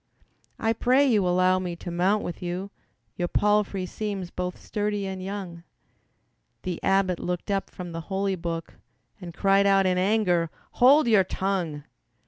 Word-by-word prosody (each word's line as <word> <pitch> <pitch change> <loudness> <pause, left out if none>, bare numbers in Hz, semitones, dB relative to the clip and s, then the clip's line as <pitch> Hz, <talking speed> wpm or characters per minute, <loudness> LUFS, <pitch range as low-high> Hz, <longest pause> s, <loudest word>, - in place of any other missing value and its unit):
"I 225 0 +1
pray 255 +5 +3
you 215 -8 +3
allow 185 +1 +3
me 180 -2 -4
to 175 +1 -7
mount 190 +5 +1
with 175 - -6
you, 180 +3 -4 0.5
Your 175 - 0
palfrey 205 -1 +1
seems 195 -2 -4
both 180 0 -4
sturdy 205 -1 -2
and 190 -1 -5
young." 190 -3 -6 1.0
The 180 -2 -3
abbot 195 -2 +2
looked 180 +3 -3
up 195 -1 -1
from 180 -2 -8
the 165 0 -5
holy 195 0 0
book 165 -1 -5 0.4
And 175 -2 -7
cried 195 +3 +3
out 195 -1 +4
in 180 -1 +2
anger, 185 -4 +2 0.2
"Hold 270 +3 +5
your 215 -4 +5
tongue! 180 -7 -2
190 Hz, 155 wpm, -26 LUFS, 180-205 Hz, 1.0 s, Hold